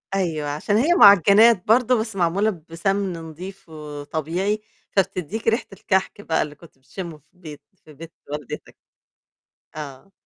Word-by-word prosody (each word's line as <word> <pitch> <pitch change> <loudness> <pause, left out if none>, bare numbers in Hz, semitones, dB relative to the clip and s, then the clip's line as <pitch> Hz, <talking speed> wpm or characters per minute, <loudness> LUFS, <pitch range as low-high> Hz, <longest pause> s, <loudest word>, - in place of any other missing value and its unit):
أيوه، 160 -6 -1
عشان 155 +8 0
هي 310 +9 +3
مُعجنات 200 - +6
برضو 245 +1 +4
بس 220 -2 -4
معمولة 190 +4 +1 0.2
بسمن 195 +3 -1
نضيف 165 +3 -9
وطبيعي، 155 +6 -3 0.3
فبتديك 195 +2 -1
ريحة 225 +2 +2
الكحك 190 +2 -1
بقى 160 -5 0
اللي 150 0 -4
كنت 160 -2 -18
بتشمه 155 +5 -8
في 150 - -33
البيت 160 -5 -11 0.2
في 155 - -14
بيت 165 +3 -11 0.2
والدتك. 150 -3 -7 1.0
آه. 150 +5 -9
180 Hz, 135 wpm, -22 LUFS, 155-205 Hz, 1.0 s, مُعجنات